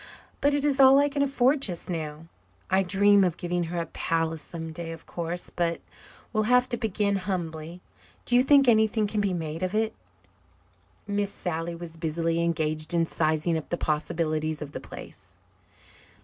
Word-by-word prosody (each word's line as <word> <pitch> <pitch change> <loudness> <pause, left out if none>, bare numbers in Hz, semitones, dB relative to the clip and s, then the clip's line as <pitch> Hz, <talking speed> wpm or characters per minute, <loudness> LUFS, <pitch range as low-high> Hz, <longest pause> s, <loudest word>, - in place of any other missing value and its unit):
But 285 0 +3
it 290 0 0
is 280 -2 +1
all 270 0 +8
I 285 +1 +4
can 285 0 -2
afford 275 0 +2
just 180 -10 -1
now. 155 -2 -5 0.5
I 190 +1 +4
dream 200 +2 +4
of 175 -3 0
giving 175 0 -1
her 175 +2 -5
a 170 - -1
palace 165 -1 -2
some 165 0 -7
day, 165 0 -6
of 165 -1 -10
course. 175 +1 -5
But 170 -1 0 0.5
we'll 215 -1 +1
have 250 0 +5
to 240 - -1
begin 205 -3 0
humbly. 175 -3 -4 0.4
Do 245 - +1
you 245 - +7
think 275 0 +5
anything 220 -1 +4
can 210 0 -1
be 200 -2 0
made 160 -2 -4
of 185 +2 -2
it?" 220 0 +1 1.1
Miss 205 -1 -1
Sally 170 -2 -4
was 165 -1 -9
busily 165 +1 -1
engaged 155 0 -1
in 165 -1 +3
sizing 160 +1 0
up 155 - -12
the 175 - -1
possibilities 155 0 -1
of 150 -2 -7
the - - -6
place. - - -12
175 Hz, 175 wpm, -27 LUFS, 165-215 Hz, 1.1 s, all